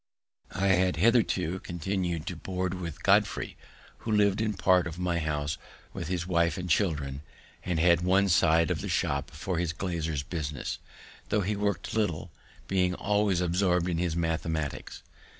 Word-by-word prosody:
I 100 +1 +1
had 95 -1 +3
hitherto 95 -3 +2
continu'd 85 -2 -3
to - - -4
board 95 -1 -3
with 85 -5 -6
Godfrey, 100 -2 +2 0.4
who 110 - -4
lived 105 0 +3
in 110 -2 0
part 90 -1 +3
of 85 0 -7
my 90 -1 0
house 75 -2 -2 0.3
with - - -5
his 90 -1 -2
wife 85 -1 +1
and 90 -1 -4
children, 75 -6 0 0.4
and 90 -3 -1
had 85 0 +4
one 95 +2 +3
side 80 -2 +4
of - - -1
the - - -4
shop 70 0 0
for 85 +3 -3
his 85 -1 -1
glazier's 80 -5 -2
business, 75 -4 -4 0.5
tho' 105 - +2
he 105 +2 -1
worked 100 -4 -2
little, 90 -6 -1 0.4
being 90 -1 +1
always 100 -2 +1
absorbed 90 0 +2
in 85 -2 -1
his 85 -2 0
mathematics. 80 -3 -2
90 Hz, 160 wpm, -28 LUFS, 80-95 Hz, 0.5 s, had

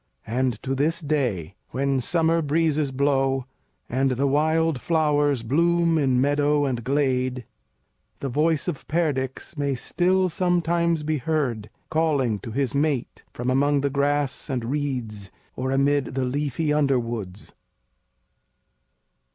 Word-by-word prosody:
And 125 +2 0
to 135 - -1
this 155 +5 0
day, 125 - -1 0.2
when 135 +1 0
summer 165 +4 +1
breezes 155 -1 +1
blow 135 -1 +1 0.4
and 135 +2 +1
the 130 +2 0
wild 155 0 +2
flowers 145 -4 +1
bloom 170 +5 +2
in 130 -3 +2
meadow 145 +1 +2
and 125 -4 -2
glade, 130 -2 0 0.7
the 140 - -3
voice 155 +5 +1
of 170 -6 -4
Perdix 145 -3 -2
may 140 -1 0
still 185 +8 +1
sometimes 170 -2 +1
be 155 0 -1
heard, 125 -7 -1 0.2
calling 140 -9 +1
to 115 - -8
his 130 +2 -1
mate 140 -3 -1
from 125 +1 -2
among 140 +2 +2
the 140 0 0
grass 145 +1 0
and 125 -4 -2
reeds 125 -9 -3 0.3
or 130 +1 -2
amid 140 0 +1
the 130 -1 0
leafy 145 +3 -1
underwoods. 120 -9 -1
140 Hz, 125 wpm, -24 LUFS, 130-155 Hz, 0.7 s, wild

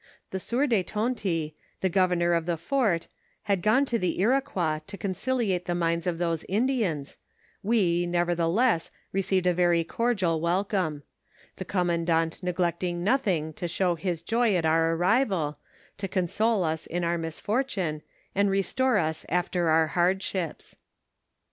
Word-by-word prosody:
The 190 - -2
sieur 240 +9 0
de 230 -8 +2
Tonty, 195 -7 -2 0.3
the 190 - +2
governor 180 -2 +2
of 170 0 0
tho 170 -1 0
fuit, 190 - 0 0.4
had 200 -4 0
gone 255 +9 +3
to 235 -3 -1
the 180 -2 -1
Iroquois 200 - +1
to 200 - -8
conciliate 200 -1 -1
the 175 - -1
minds 170 0 0
of 175 -2 0
those 165 -2 -1
Indians, 205 - -1 0.4
we, 180 -5 +2
nevertheless, 175 +3 +1 0.2
ro* 195 - +1
ceived 190 -1 0
a 180 - +4
very 175 -1 +3
cordial 185 -5 0
welcome; 175 -3 0 0.5
the 185 - -5
commandant 170 -3 0
neglecting 175 -1 -1
nothing 185 - +1
to 175 - -4
show 175 +1 +1
his 170 0 -3
joy 230 +1 +2
at 170 -2 +1
our 165 +1 +3
arrival, 180 - +1 0.4
to 195 - -2
console 205 +3 +1
us 160 -1 -2
in 175 +1 -2
our 170 0 0
misfortunes, 175 - -2 0.3
and 200 +1 +2
restore 210 +6 +1
us 160 -3 -1
after 175 -1 0
our 160 0 +4
hardships. 180 0 -1
180 Hz, 145 wpm, -27 LUFS, 170-205 Hz, 0.5 s, a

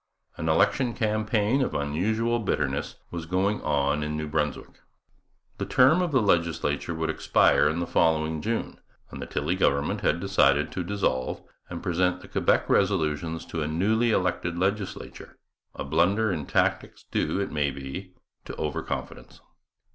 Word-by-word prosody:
An 80 +1 -3
election 120 +9 +2
campaign 110 +2 +1
of 130 - -1
unusual 110 +11 0
bitterness 75 -10 -2 0.2
was 85 -2 -5
going 95 +4 0
on 70 0 +1
in 75 0 -2
New 75 0 -3
Brunswick. 75 -1 -3 0.8
The - - -2
term 135 +8 +5
of 175 -3 -1
the 130 -5 +3
legislature 85 -2 0
would 80 0 -1
expire - - +3
in 80 - -2
the 85 - -1
following 80 -2 +1
June; 115 +4 -3 0.3
and - - -8
the - - -5
Tilley 90 - -1
government 70 -6 +1
had 85 - +1
decided 75 -6 +2
to 90 - -3
dissolve 85 -10 -1 0.3
and 85 -1 -6
present 90 +1 0
the - - -12
Quebec - - +1
resolutions 80 -4 0
to 80 - -4
a 75 - -1
newly 110 +9 +1
elected 90 -4 0
legislature, 100 +2 -3 0.4
a - - -4
blunder 95 +9 +2
in 80 -6 -3
tactics - - 0
due, - - 0
it 100 - -2
may 75 -2 +1
be, 70 +8 -7 0.3
to - - -7
over 75 -2 -2
confidence. - - -6
85 Hz, 155 wpm, -26 LUFS, 75-100 Hz, 0.8 s, term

